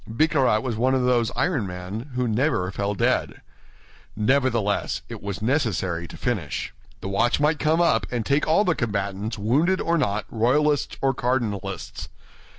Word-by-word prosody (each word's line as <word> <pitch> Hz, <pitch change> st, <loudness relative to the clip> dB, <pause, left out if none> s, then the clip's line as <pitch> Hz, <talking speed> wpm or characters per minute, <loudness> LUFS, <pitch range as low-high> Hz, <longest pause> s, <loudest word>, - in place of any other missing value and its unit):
Bicarat 130 Hz, -3 st, +2 dB
was 120 Hz, -4 st, -2 dB
one 130 Hz, +3 st, +2 dB
of 130 Hz, -, +1 dB
those 120 Hz, -2 st, +2 dB
iron 145 Hz, -, 0 dB
men 90 Hz, +8 st, -6 dB
who 125 Hz, -1 st, 0 dB
never 110 Hz, -5 st, 0 dB
fell 100 Hz, +1 st, -2 dB
dead. -, -, 0 dB, 0.7 s
Nevertheless, 115 Hz, -2 st, +1 dB
it -, -, -7 dB
was 100 Hz, 0 st, -5 dB
necessary 95 Hz, -, 0 dB
to -, -, -11 dB
finish. 95 Hz, -, -3 dB, 0.3 s
The -, -, -5 dB
watch 100 Hz, +7 st, +1 dB
might 150 Hz, +1 st, +2 dB
come 160 Hz, +2 st, +2 dB
up 115 Hz, -, +2 dB
and 120 Hz, -3 st, -2 dB
take 140 Hz, +2 st, +1 dB
all 165 Hz, +7 st, +4 dB
the 180 Hz, -, +3 dB
combatants, 105 Hz, -2 st, -3 dB
wounded 150 Hz, -, +2 dB
or 170 Hz, 0 st, +1 dB
not, 105 Hz, -5 st, 0 dB
royalists 145 Hz, +6 st, +1 dB
or 135 Hz, 0 st, +3 dB
cardinalists. 105 Hz, -8 st, -3 dB
120 Hz, 155 wpm, -24 LUFS, 100-140 Hz, 0.7 s, all